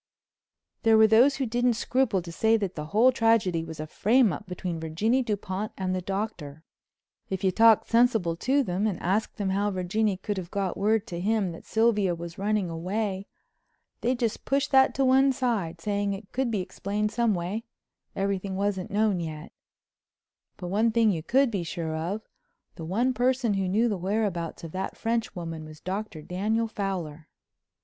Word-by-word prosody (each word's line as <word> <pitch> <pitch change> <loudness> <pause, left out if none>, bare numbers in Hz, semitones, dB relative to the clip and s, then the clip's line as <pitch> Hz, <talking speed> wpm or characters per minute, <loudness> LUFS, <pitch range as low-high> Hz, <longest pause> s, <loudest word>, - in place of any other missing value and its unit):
There 225 -3 +5
were 220 - +7
those 235 +6 +5
who 270 - -1
didn't 245 +1 +1
scruple 235 -6 0
to 170 - -8
say 220 +6 +3
that 200 -4 -3
the 150 -1 -6
whole 225 +10 +4
tragedy 225 -9 +2
was 160 -1 -8
a 155 - -3
frame 220 +5 +3
up 145 - -8
between 180 -2 -4
Virginie 200 +11 +1
Dupont 210 -2 -3
and 185 -1 -1
the 185 - -1
Doctor. 180 -6 -4 0.7
If 190 0 -3
you 190 - +3
talked 225 +2 +5
sensible 230 -8 +3
to 270 +9 +2
them 190 0 -1
and 195 -5 -2
asked 200 +5 -1
them 195 -2 -1
how 200 +2 +1
Virginie 195 +2 0
could 205 +2 -4
have 180 -2 -5
got 195 -2 -2
word 215 +1 +1
to 175 -7 -6
him 205 -1 0
that 165 - -11
Sylvia 210 -5 +2
was 170 +1 -8
running 205 -1 0
away, 190 +4 -3 0.7
they'd 250 +2 +1
just 235 -3 -2
push 275 +1 +1
that 265 -1 +4
to 270 - +2
one 265 +1 +5
side, 220 -11 -1
saying 200 +2 -1
it 195 0 -9
could 260 -1 -1
be 210 -4 -1
explained 205 +3 -3
some 235 -3 +1
way, 180 +6 -3 0.5
everything 195 -1 -2
wasn't 195 -1 -1
known 205 -2 +1
yet—but 160 +3 -12
one 210 +5 +2
thing 225 -1 +3
you 165 -4 -2
could 260 - +2
be 200 -4 -1
sure 165 -1 -4
of—the 175 -1 -8
one 235 +10 +1
person 245 -1 +1
who 195 -1 0
knew 220 +5 +2
the 205 -5 -2
whereabouts 185 -4 -2
of 165 - -7
that 190 +2 -4
French 230 0 -1
woman 165 -3 -5
was 155 0 -11
Dr. 190 -4 -5
Daniel 215 +7 -1
Fowler. 180 -8 -4
200 Hz, 180 wpm, -27 LUFS, 180-225 Hz, 0.7 s, were